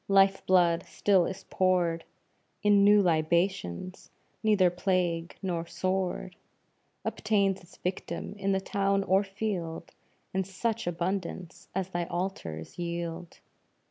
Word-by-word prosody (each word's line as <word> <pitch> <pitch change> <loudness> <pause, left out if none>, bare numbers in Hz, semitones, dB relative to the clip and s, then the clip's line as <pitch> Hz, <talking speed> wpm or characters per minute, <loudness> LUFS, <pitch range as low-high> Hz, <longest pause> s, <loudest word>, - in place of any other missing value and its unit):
Life 195 0 +4
blood 175 -2 +4
still 190 -4 +3
is 190 - -7
poured 175 -3 +1 0.6
In 205 -1 +5
new 205 0 +6
libations 170 - 0 0.3
neither 205 -5 +4
plague 175 -2 0
nor 170 -3 -2
sword 185 0 -2 0.7
Obtains 200 -3 +1
its 175 +1 -18
victims, 180 +1 -4
in 195 0 +1
the 190 - +2
town 195 0 +1
or 195 +1 +3
field, 195 -5 -4 0.4
In 190 0 +1
such 210 +3 -2
abundance 175 0 -3
as 190 -1 -1
thy 175 -2 -2
altars 175 - -4
yield. 170 0 -4
185 Hz, 115 wpm, -29 LUFS, 170-195 Hz, 0.7 s, new